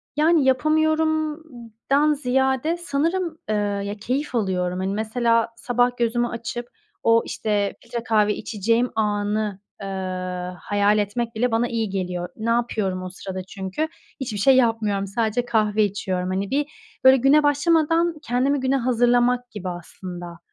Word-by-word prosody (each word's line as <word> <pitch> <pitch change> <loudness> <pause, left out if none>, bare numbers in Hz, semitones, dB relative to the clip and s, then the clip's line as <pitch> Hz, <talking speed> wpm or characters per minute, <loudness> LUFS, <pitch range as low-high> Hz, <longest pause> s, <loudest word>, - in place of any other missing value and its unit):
Yani, 310 +1 +4
yapamıyorumdan 305 -2 +1
ziyade 265 +3 +1
sanırım, 335 +2 -1
eee, 215 - +1
ya, 205 -1 -1
keyif 260 +4 -2
alıyorum. 180 -4 0
Hani, 190 +1 -1
mesela 230 +2 +1
sabah 245 +1 +1
gözümü 240 0 +1
açıp 235 +1 -5 0.4
o, 230 0 +5
işte, 205 -2 -1
filtre 235 0 -5
kahve 210 -3 +2
içeceğim 230 +4 0
anı, 210 -1 -1 0.2
eee, 195 - -5 0.7
hayal 205 +1 +2
etmek 225 +3 -2
bile 245 +2 +1
bana 230 +2 +2
iyi 225 -3 -2
geliyor. 180 -2 -3
Ne 220 +1 -3
yapıyorum 215 -6 0
o 185 - -5
sırada 185 0 -6
çünkü? 190 +10 -4 0.3
Hiçbir 235 -6 -4
şey 265 +7 +5
yapmıyorum, 220 -5 +1
sadece 225 +3 -1
kahve 215 -2 +2
içiyorum. 185 -2 -2
Hani, 195 +2 -2
bir, 290 +2 +1 0.4
böyle, 260 0 +8
güne 275 +4 +4
başlamadan 325 +3 +2
kendimi 270 +3 +1
güne 265 +1 +1
hazırlamak 245 0 +2
gibi 190 -4 -5
aslında. 175 0 -8
230 Hz, 135 wpm, -23 LUFS, 205-265 Hz, 0.7 s, böyle